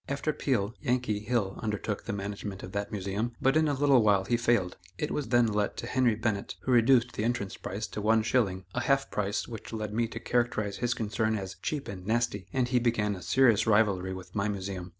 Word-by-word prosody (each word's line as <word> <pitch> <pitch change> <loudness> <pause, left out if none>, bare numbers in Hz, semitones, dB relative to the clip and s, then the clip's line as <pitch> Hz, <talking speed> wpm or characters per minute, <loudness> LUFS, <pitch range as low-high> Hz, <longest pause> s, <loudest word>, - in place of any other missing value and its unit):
After 140 +2 -1
Peale, 115 -8 0
"Yankee" 125 -6 0
Hill 105 -3 -1
undertook 105 -1 -3
the - - -3
management 100 0 -5
of 90 - -7
that 100 0 -3
Museum, 105 +3 -2
but 135 +2 +2
in 155 0 +4
a 145 - +1
little 135 -2 +4
while 100 -3 +3
he 120 - +1
failed. 115 -6 +1 0.2
It 150 - -2
was 145 - -2
then 120 +1 +4
let 105 -2 -1
to - - -4
Henry 120 -2 +2
Bennett, 110 -2 -2
who - - -2
reduced 120 0 +5
the 105 - -3
entrance 115 -4 -1
price 100 +4 -5
to 105 - -5
one 110 +1 +3
shilling, 100 -6 +1
a - - -1
half 140 0 +1
price 100 0 -1
which 110 -2 -8
led 110 -2 -4
me 115 +1 +1
to 115 - -7
characterize 115 -5 0
his 120 0 0
concern 110 0 0
as 95 -2 -6
"cheap 150 -3 -3
and 95 -2 -7
nasty," 110 -4 0
and 125 -2 0
he 125 0 +3
began 115 -3 +1
a 90 - -9
serious 115 -3 +3
rivalry 100 -4 +3
with 90 -1 -8
my 100 0 0
Museum. 95 -3 -4
110 Hz, 220 wpm, -29 LUFS, 100-120 Hz, 0.2 s, reduced